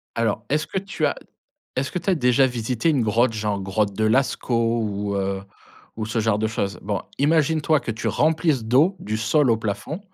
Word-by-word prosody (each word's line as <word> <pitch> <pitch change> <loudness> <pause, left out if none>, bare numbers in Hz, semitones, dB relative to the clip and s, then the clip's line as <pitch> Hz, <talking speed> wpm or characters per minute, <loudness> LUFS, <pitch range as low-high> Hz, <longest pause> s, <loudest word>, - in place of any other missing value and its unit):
Alors, 115 -2 0
est-ce 155 +2 0
que 190 - -4
tu 195 +1 -2
as - - 0 0.6
est-ce 130 +2 -1
que - - -2
tu 170 - -8
as 190 - +5
déjà 130 -3 +3
visité 120 +2 -1
une 145 -6 +3
grotte? 115 +2 +2
Genre 105 -2 -2
grotte 100 +1 -1
de 110 - 0
Lascaux 115 -1 +1
ou 100 -1 -2
heu, 95 0 -2 0.5
ou 110 -1 -3
ce 110 +1 -1
genre 110 -1 +1
de 110 - +1
chose. 100 -2 -3
Bon, 100 0 -2 0.2
imagine-toi 155 0 +2
que - - -4
tu 110 -1 -3
remplisses 155 -5 +1
d'eau 140 - +3
du 110 +1 -3
sol 115 +5 +2
au 115 - +4
plafond 110 - -4
115 Hz, 200 wpm, -23 LUFS, 105-145 Hz, 0.6 s, as